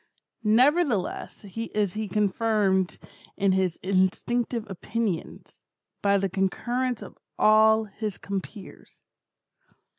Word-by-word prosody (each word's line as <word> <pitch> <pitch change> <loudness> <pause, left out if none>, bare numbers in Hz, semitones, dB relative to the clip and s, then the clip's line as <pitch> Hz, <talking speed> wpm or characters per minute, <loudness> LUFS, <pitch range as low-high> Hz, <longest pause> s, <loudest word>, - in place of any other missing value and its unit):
Nevertheless 245 - +2
is 210 -1 -2
he 215 0 -3
confirmed 200 -1 +1 0.4
in 195 -1 +2
his 185 -2 +1
instinctive 215 +5 0
opinions, 205 -1 -4 0.4
by 200 0 +3
the 195 0 0
concurrence 240 +7 -1
of - - -13 0.2
all 220 +1 +5
his 215 0 -5
compeers. 200 +1 -7
210 Hz, 90 wpm, -26 LUFS, 190-225 Hz, 0.4 s, all